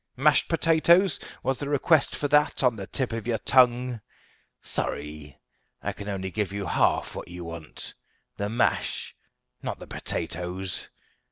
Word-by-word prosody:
Mashed 145 Hz, +3 st, +4 dB
potatoes? 170 Hz, +3 st, +4 dB, 0.2 s
Was 135 Hz, -1 st, 0 dB
the 145 Hz, -, -3 dB
request 145 Hz, +1 st, +3 dB
for 145 Hz, -, -1 dB
that 150 Hz, -1 st, +3 dB
on 125 Hz, -3 st, +4 dB
the 100 Hz, -3 st, -6 dB
tip 130 Hz, -4 st, -1 dB
of 115 Hz, -1 st, -4 dB
your 115 Hz, -2 st, +1 dB
tongue? 125 Hz, 0 st, +3 dB, 0.6 s
Sorry 75 Hz, -1 st, -3 dB, 0.5 s
I -, -, -2 dB
can 100 Hz, -, -8 dB, 0.2 s
give 100 Hz, +1 st, -2 dB
you 100 Hz, 0 st, -3 dB
only -, -, -3 dB
half -, -, +2 dB
what -, -, -7 dB
you 90 Hz, 0 st, -8 dB
want 85 Hz, -2 st, -6 dB, 0.4 s
the 100 Hz, 0 st, -2 dB
mash, 115 Hz, -, 0 dB, 0.5 s
not -, -, -4 dB
the -, -, -10 dB
potatoes. 90 Hz, +2 st, -3 dB
115 Hz, 150 wpm, -26 LUFS, 95-140 Hz, 0.6 s, Mashed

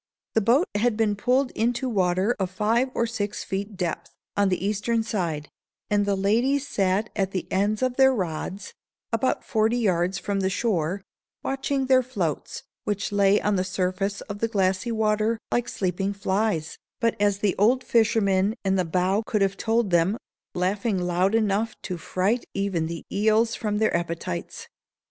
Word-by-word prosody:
The 225 Hz, -, +3 dB
boat 245 Hz, -, +3 dB
had 215 Hz, +2 st, +1 dB
been 215 Hz, -2 st, +2 dB
pulled 250 Hz, +5 st, +1 dB
into 240 Hz, +3 st, 0 dB
water 190 Hz, 0 st, +1 dB
of 190 Hz, -2 st, 0 dB
five 220 Hz, +7 st, +1 dB
or 235 Hz, -, +2 dB
six 210 Hz, -3 st, -3 dB
feet 200 Hz, +1 st, -4 dB
depth, 175 Hz, -3 st, -3 dB, 0.3 s
on 200 Hz, -1 st, +3 dB
the 185 Hz, 0 st, -1 dB
eastern 215 Hz, +3 st, 0 dB
side, 170 Hz, -9 st, -2 dB, 0.4 s
and 205 Hz, -1 st, +2 dB
the 200 Hz, -, +2 dB
ladies 240 Hz, +9 st, +1 dB
sat 200 Hz, -2 st, 0 dB
at 195 Hz, -3 st, 0 dB
the 185 Hz, -2 st, -3 dB
ends 205 Hz, +5 st, +1 dB
of 255 Hz, -1 st, 0 dB
their 265 Hz, 0 st, +6 dB
rods, 185 Hz, -2 st, -4 dB, 0.4 s
about 230 Hz, +3 st, +1 dB
forty 220 Hz, +2 st, +1 dB
yards 185 Hz, -4 st, +1 dB
from 195 Hz, +1 st, -2 dB
the 190 Hz, 0 st, +1 dB
shore, 190 Hz, -3 st, -1 dB, 0.4 s
watching 270 Hz, 0 st, -1 dB
their 260 Hz, 0 st, +5 dB
floats, 200 Hz, -, -3 dB, 0.2 s
which 205 Hz, -1 st, -2 dB
lay 200 Hz, 0 st, +4 dB
on 205 Hz, -1 st, +1 dB
the 185 Hz, -, +1 dB
surface 190 Hz, +1 st, -2 dB
of 205 Hz, -1 st, -7 dB
the 230 Hz, -, +1 dB
glassy 195 Hz, 0 st, 0 dB
water 220 Hz, 0 st, +1 dB
like 240 Hz, -, 0 dB
sleeping 195 Hz, +1 st, -1 dB
flies, 195 Hz, -4 st, -1 dB, 0.2 s
but, 230 Hz, -2 st, +1 dB
as 205 Hz, -1 st, +2 dB
the 200 Hz, -2 st, 0 dB
old 250 Hz, +5 st, +4 dB
fisherman 210 Hz, -3 st, +2 dB
in 190 Hz, 0 st, +2 dB
the 185 Hz, -, +1 dB
bow 185 Hz, +5 st, +1 dB
could 210 Hz, -2 st, 0 dB
have 195 Hz, 0 st, +1 dB
told 225 Hz, -1 st, 0 dB
them, 175 Hz, +5 st, +3 dB, 0.4 s
laughing 195 Hz, +3 st, 0 dB
loud 180 Hz, +3 st, +1 dB
enough 215 Hz, 0 st, +1 dB
to 180 Hz, -3 st, -4 dB
fright 200 Hz, +8 st, 0 dB
even 195 Hz, -5 st, 0 dB
the 165 Hz, 0 st, -6 dB
eels 220 Hz, +3 st, +2 dB
from 210 Hz, -3 st, -2 dB
their 220 Hz, -3 st, +2 dB
appetites. 170 Hz, -, -4 dB
205 Hz, 170 wpm, -25 LUFS, 190-225 Hz, 0.4 s, their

